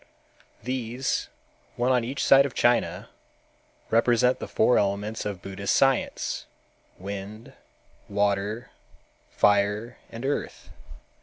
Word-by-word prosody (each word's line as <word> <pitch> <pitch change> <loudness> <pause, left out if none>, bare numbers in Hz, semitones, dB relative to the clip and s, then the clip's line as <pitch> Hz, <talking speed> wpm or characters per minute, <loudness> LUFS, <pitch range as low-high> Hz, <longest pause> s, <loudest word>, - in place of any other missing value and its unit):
These, 125 - -2 0.5
one 125 +1 +1
on 125 -2 +3
each 130 +4 -3
side 135 +1 +6
of 130 - -12
China, 120 0 +1 0.8
represent 120 +2 +3
the - - -5
four 125 - +3
elements 105 +2 -2
of 95 -4 -6
Buddhist 95 0 -2
science, 135 -2 +1 0.5
wind, 100 +3 -8 0.6
water, 100 +2 -1 0.6
fire 105 +3 +1
and 115 +3 -7
earth. 145 - -3
115 Hz, 100 wpm, -26 LUFS, 100-125 Hz, 0.8 s, side